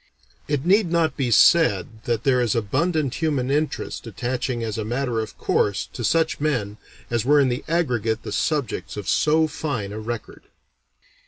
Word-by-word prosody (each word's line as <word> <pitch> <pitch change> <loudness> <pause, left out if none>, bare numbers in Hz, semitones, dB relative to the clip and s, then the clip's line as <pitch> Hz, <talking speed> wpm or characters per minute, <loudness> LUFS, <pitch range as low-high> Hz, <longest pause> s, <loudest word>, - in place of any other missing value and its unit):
It 145 0 -1
need 190 -1 +3
not 165 -2 +1
be 130 -3 -1
said 110 - +4
that 115 -1 -1
there 130 -2 +3
is 120 -4 +1
abundant 140 - 0
human 140 -5 0
interest 150 -4 -2
attaching 120 +2 -3
as 110 -1 -3
a - - -1
matter 120 +1 -1
of 110 - -5
course 100 -2 0
to 120 - -5
such 160 +5 +1
men 120 -9 -1 0.3
as 120 -2 +1
were 145 +4 +4
in 135 -2 +3
the 125 +2 -3
aggregate 120 -9 0
the - - -6
subjects 145 -10 -2
of 100 -3 -6
so 160 +1 +3
fine 145 -10 -4
a 110 - -5
record. 115 +1 -6
125 Hz, 170 wpm, -23 LUFS, 110-155 Hz, 0.3 s, said